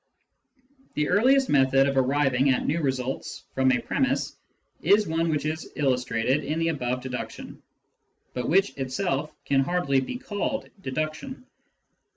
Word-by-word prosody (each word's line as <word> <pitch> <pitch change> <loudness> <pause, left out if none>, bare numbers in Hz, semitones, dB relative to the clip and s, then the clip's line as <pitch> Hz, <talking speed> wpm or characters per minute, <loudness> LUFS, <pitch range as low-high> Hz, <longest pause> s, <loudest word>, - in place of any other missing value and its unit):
The 150 0 0
earliest 260 +8 +4
method 135 -1 +4
of 140 - -1
arriving 135 0 +2
at 130 - +1
new 165 +3 0
results 130 -2 -3
from 130 0 +3
a 130 - +3
premiss - - -1 0.5
is 205 +5 +4
one 165 0 0
which 150 -2 -1
is 155 +1 -4
illustrated 130 0 +1
in 150 +3 -2
the 165 0 +1
above 125 -5 -2
deduction, 130 -1 -6 0.7
but 125 - -3
which 195 +5 +3
itself 145 +2 -2
can 135 -1 +3
hardly 140 -2 +1
be 130 - -5
called 245 +5 -3
deduction. 155 - -4
145 Hz, 140 wpm, -26 LUFS, 130-165 Hz, 0.7 s, earliest